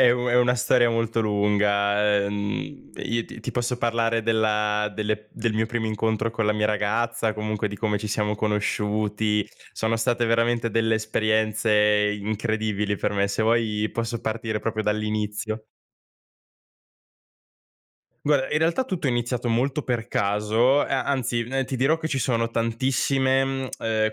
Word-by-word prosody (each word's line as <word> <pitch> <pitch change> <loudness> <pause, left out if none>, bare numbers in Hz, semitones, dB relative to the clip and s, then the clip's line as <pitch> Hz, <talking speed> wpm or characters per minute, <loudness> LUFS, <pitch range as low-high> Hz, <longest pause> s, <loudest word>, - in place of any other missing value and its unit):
è 125 - +7
u 125 0 -1
è 120 - +3
una 125 0 +4
storia 125 0 +3
molto 115 0 0
lunga. 105 -1 +2
Uhm, 100 0 -4
io 115 0 -2
t 115 - -11
ti - - -4
posso 125 0 -1
parlare 115 -1 0
della 105 -1 +1
delle 105 0 -2
del 115 -1 -2
mio 110 +1 +1
primo 110 0 -2
incontro 110 +1 -1
con 110 -1 -1
la 105 - +3
mia 105 0 +1
ragazza, 110 +2 0
comunque 110 0 -2
di 105 0 -5
come 105 0 0
ci 105 - -5
siamo 105 0 -1
conosciuti, 105 0 0 0.3
sono 110 +1 0
state 120 +1 +1
veramente 115 0 +1
delle 115 +1 +2
esperienze 110 0 +1 0.5
incredibili 110 -1 -1
per - - -1
me. 100 0 +1
Se 100 +2 -1
vuoi 110 -2 +1
posso 115 0 -3
partire 110 -1 -3
proprio 110 -1 -2
dall'inizio. 105 0 -2 2.6
Guarda, 145 -2 +2
in 150 - +3
realtà 165 +11 +1
tutto 185 - -3
è - - +3
iniziato 120 0 -1
molto 130 +5 0
per 120 -4 -2
caso, 105 +7 +2
a 135 -2 0
anzi 125 -4 -1 0.2
ti 130 - -4
dirò 135 +6 +3
che 160 - -3
ci 140 -3 -1
sono 115 -2 0
tantissime, 130 +3 +1
mhmm, 115 -5 -1
110 Hz, 150 wpm, -24 LUFS, 105-120 Hz, 2.6 s, è